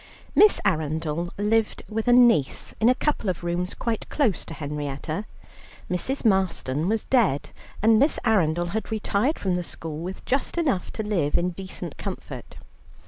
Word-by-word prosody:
Miss 425 -1 +6
Arundel 160 -1 -1
lived 210 +2 +1
with 225 +2 -3
a - - +5
niece 240 - +4
in 225 - +5
a 255 - +4
couple 270 -7 -1
of 175 -1 -3
rooms 175 +1 -2
quite 230 -2 -3
close 250 - +1
to 165 - -8
Henrietta. 150 +4 -4 0.7
Mrs. 255 +10 -2
Marston 185 -6 +1
was 220 0 0
dead, 220 - +2 0.3
and 220 0 +6
Miss 285 +5 +3
Arundel 175 -6 +2
had 220 +4 -3
retired 220 +6 0
from 185 -2 0
the - - -1
school 160 -2 -6
with 185 +3 -6
just 270 +5 -1
enough 275 - 0
to 220 - -3
live 175 -9 +1
in 180 +1 0
decent 190 +2 -7
comfort. - - -7
190 Hz, 160 wpm, -25 LUFS, 165-225 Hz, 0.7 s, Miss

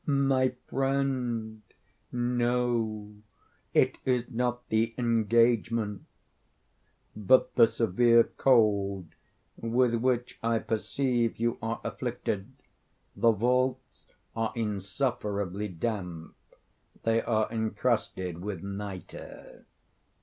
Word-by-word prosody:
"My 135 -3 +2
friend, 130 -5 -1 0.5
no. 120 -3 0 0.6
It - - +2
is 125 -1 0
not 120 0 -2
the 115 +1 +1
engagement, 115 -2 +2 1.1
but 105 +5 +3
the 115 -2 +6
severe 115 +2 +4
cold 100 -9 +2 0.5
with 120 +1 +1
which 125 +1 0
I 115 0 +1
perceive 120 +2 -1
you 115 +1 -1
are 115 +1 -2
afflicted. 120 -3 -3 0.6
The 115 - +4
vaults 125 +4 -1 0.3
are 115 -1 -1
insufferably 105 -2 -2
damp. 90 -3 -4 0.7
They 115 0 +2
are 110 -2 +1
encrusted 110 -6 -1
with 100 -4 -5
nitre." 100 -1 -8
115 Hz, 85 wpm, -29 LUFS, 105-125 Hz, 1.1 s, the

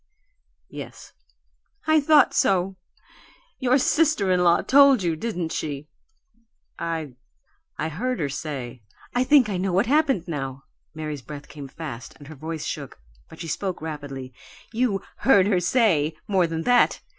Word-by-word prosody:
"Yes." - - -10 0.7
"I 315 -1 +4
thought 295 +1 +5
so! 190 0 +2 0.8
Your 255 0 +3
sister 280 - +2
in 180 -1 +3
law 170 -1 +4
told 275 -5 +6
you, 170 -2 0
didn't 175 -4 -3
she?" 150 0 -4 0.9
"I 165 -5 -3 0.6
I 160 - -2
heard 245 +11 -2
her 145 - 0
say 135 -4 -6 0.2
" - - -25
"I 245 - +2
think 270 -3 +5
I 200 -3 -2
know 190 +1 -1
what 195 +5 +3
happened, 270 - +2
now." 135 -4 -5 0.3
Mary's 155 -3 -5
breath 145 +3 -9
came 145 -2 -9
fast 135 -4 -8
and 145 - -14
her 155 - -9
voice 155 +2 -5
shook, 140 -4 -6 0.3
but 160 - -13
she 165 - -5
spoke 185 +4 -3
rapidly. 145 -5 -7 0.4
"You 220 -5 0
'heard 200 -7 +5
her 200 -3 +2
say' 175 - +2
more 190 -4 +2
than 165 0 -3
that. 245 +3 +3
170 Hz, 155 wpm, -24 LUFS, 150-235 Hz, 0.9 s, told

